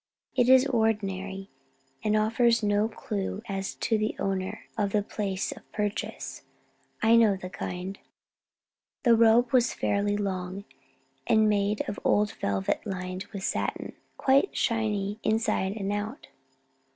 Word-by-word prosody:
It 245 -1 +3
is 260 0 +7
ordinary, 195 -5 -1 0.5
and 215 0 +2
offers 230 +2 +3
no 205 +1 +2
clue 205 -1 -4
as 195 -2 -3
to 220 -2 0
the 215 +1 -1
owner 195 +2 -2
or 210 -4 +1
the 205 +1 0
place 195 -2 -3
of - - -12
purchase. 210 -1 -3 0.6
I 225 +1 +6
know 225 -4 +5
the 185 -1 -8
kind." 185 +2 -5 1.0
The 235 -3 +6
robe 230 +2 +4
was 245 -2 +3
fairly 205 0 0
long, 190 -1 -3 0.6
and 220 -1 +4
made 205 0 +1
of 205 - -4
old 210 0 +3
velvet 95 -1 -1
lined 185 0 -4
with 200 -3 -8
satin, - - -2 0.2
quite 275 +7 +3
shiny 210 -3 0
inside 215 -3 +1
and 200 -1 -2
out. 215 +7 -5
205 Hz, 135 wpm, -28 LUFS, 195-225 Hz, 1.0 s, is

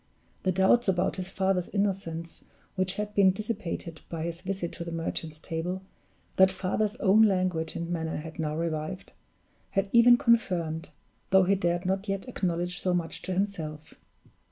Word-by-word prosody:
The 185 - +1
doubts 190 +6 +4
about 185 0 +1
his 185 0 -4
father's 190 -2 0
innocence 185 -5 -2 0.3
which 185 0 -1
had 210 0 -3
been 200 -2 +6
dissipated 190 -5 -4
by 165 -2 -4
his 170 +1 -4
visit 185 -2 -3
to 170 - -6
the 170 - -6
Merchant's 165 -1 -4
Table, 170 +4 -4 0.5
that 190 0 +7
father's 205 +3 -1
own 210 -1 +4
language 185 -6 +2
and 170 - -3
manner 160 -2 -2
had 160 +2 -8
now 155 -1 -1
revived 165 +2 -3 0.6
had 195 0 0
even 240 +1 +7
confirmed, 180 -10 +1 0.4
though 190 0 +6
he 190 +2 +3
dared 175 -2 0
not 190 +2 -1
yet 195 +3 -2
acknowledge 180 -5 -2
so 180 -1 +1
much 170 -2 -2
to 185 - -3
himself. 160 -6 -3
185 Hz, 160 wpm, -28 LUFS, 165-195 Hz, 0.6 s, that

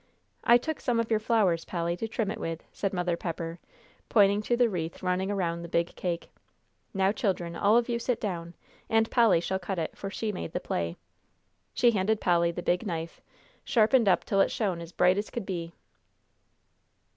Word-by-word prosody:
"I 235 - +7
took 315 +5 -4
some 240 -3 +1
of 230 0 -1
your 220 - +3
flowers, 210 -7 +2
Polly, 170 -1 -2
to 225 - -3
trim 220 -2 -2
it - - -6
with," 165 0 -4
said 195 - -2
Mother 180 -2 0
Pepper, 165 0 -5 0.5
pointing 205 -1 +4
to 240 +3 0
the 245 -1 +4
wreath 170 -6 -4
running 185 +1 0
around 170 -4 -1
the 170 - -6
big 170 0 0
cake. 175 -2 -3 0.6
"Now, 195 -1 +2
children, 185 -5 -2
all 205 +6 +4
of 240 - +2
you 235 -1 -1
sit 240 0 -1
down, 170 -4 -4 0.3
and 225 0 +2
Polly 230 -8 +5
shall 190 +3 -2
cut 190 +1 -4
it, 165 - -3
for 195 - -5
she 215 +2 -3
made 85 - -6
the - - -1
play." 85 -1 -3 0.8
She 240 - +5
handed 210 +1 +1
Polly 170 -1 +3
the 175 +1 -6
big 180 +3 +1
knife, 165 -2 -5 0.4
sharpened 230 -1 +4
up - - +3
till 195 -1 +2
it - - +3
shone 190 -6 -1
as 170 0 -9
bright 180 +2 +3
as 210 - -4
could 235 -5 -5
be. 170 -3 -4
190 Hz, 195 wpm, -28 LUFS, 170-220 Hz, 0.8 s, I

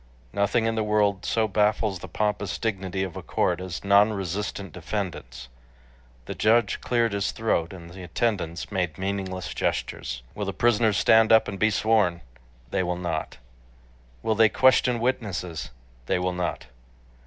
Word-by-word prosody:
Nothing 105 +3 +1
in 115 - +1
the 110 - 0
world 105 -2 +1
so 110 -1 +1
baffles 105 -1 +1
the - - -8
pompous 105 -2 -1
dignity 95 -4 -2
of 95 -3 -5
a - - -5
court 90 0 0
as 90 -2 -6
non 100 +2 +5
resistant 100 0 -4
defendants. 85 - -5 0.8
The - - -5
judge 115 +2 +2
cleared 115 -3 +1
his 100 0 0
throat 85 -7 0
and 85 -3 -10
the 95 +2 -10
attendants 90 -1 -2
made 90 -5 -1
meaningless 95 -1 -3
gestures. - - -3
"Will 105 - -4
the 100 - -3
prisoners 110 0 +2
stand 110 0 +5
up 110 0 +6
and 100 -1 -5
be 110 - +4
sworn?" 105 -5 +2 0.5
They - - +1
will 90 -1 -1
not. 85 -3 -3 0.9
"Will 110 - +2
they 110 0 +5
question 130 -1 +4
witnesses?" 100 - -2 0.4
They - - +2
will 90 0 -1
not. 90 -1 -3
100 Hz, 155 wpm, -25 LUFS, 90-110 Hz, 0.9 s, up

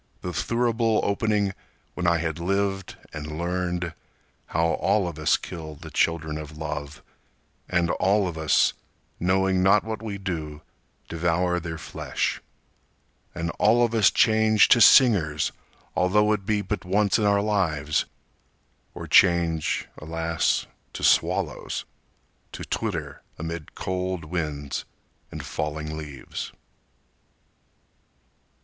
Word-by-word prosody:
The 90 - -4
thurible 115 -1 +1
opening 100 -1 +1 0.4
when 90 - -2
I 85 0 +4
had 80 0 -3
lived 95 +1 -1 0.2
and 75 0 -6
learned 90 0 -2 0.5
How 80 +1 +1
all 100 -4 +1
of 80 -3 -6
us 75 - +3
kill 80 -3 -8
the - - -11
children 80 -2 0
of 75 0 -9
love, 75 -2 -6 0.7
and 85 -1 +1
all 100 +1 +2
of 85 - -5
us, 80 -1 +3 0.5
Knowing 95 +1 +2
not 100 +3 +5
what 110 -1 -5
we 105 -3 -5
do, 80 -6 -5 0.4
devour 90 +2 0
their 80 -1 -5
flesh; 85 - -3 0.9
And 85 -1 -2
all 120 +3 +5
of 115 - -4
us 110 -4 +5
change 110 -1 +4
to 120 - +6
singers, 90 - +5 0.4
although 105 +3 +3
it 100 -2 -4
be 105 -2 +1
But 105 0 -3
once 100 +3 +2
in 105 - +1
our 100 0 +3
lives, 80 -8 0 0.9
or - - -6
change—alas!—to 80 -1 +1
swallows, - - +1 0.7
To - - -6
twitter - - -3 0.2
amid 80 -1 -6
cold 90 -2 -3
winds 75 -4 -3 0.5
and - - -7
falling 75 +1 -4
leaves! 75 -3 -7
90 Hz, 115 wpm, -25 LUFS, 80-100 Hz, 0.9 s, to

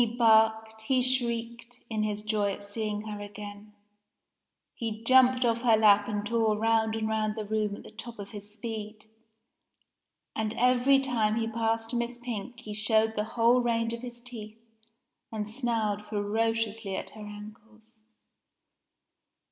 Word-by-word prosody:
He 235 - +3
barked, 220 -1 +3
he 260 -1 +3
shrieked, 240 -1 0
in 220 -2 -2
his 210 -1 -2
joy 210 -2 0
at 205 - -9
seeing 210 0 -3
her 210 -1 -6
again. 205 0 -9 1.0
He 225 -1 -5
jumped 255 +1 +5
off 230 0 +1
her 230 -3 +4
lap 205 -1 +5
and 205 0 -2
tore 220 -1 +1
round 225 0 +2
and 220 -1 -1
round 215 -1 -1
the 215 -2 -4
room 210 -1 -1
at - - -12
the - - -12
top 230 +2 -9
of 200 -1 -8
his 205 -1 -9
speed; 215 0 -6 1.3
and 220 0 -2
every 250 +2 +4
time 235 -6 +1
he 225 0 -1
passed 225 0 -1
Miss 240 0 -2
Pink 240 0 -6
he 215 -4 -7
showed 220 +1 +3
the 210 - 0
whole 235 +2 +5
range 230 -1 0
of 235 - -6
his 240 -1 -8
teeth 225 -3 -9 0.7
and 215 -2 -3
snarled 220 -3 -1
ferociously 220 0 -1
at - - -5
her 215 - -12
ankles. 215 +2 -12
220 Hz, 155 wpm, -28 LUFS, 210-235 Hz, 1.3 s, jumped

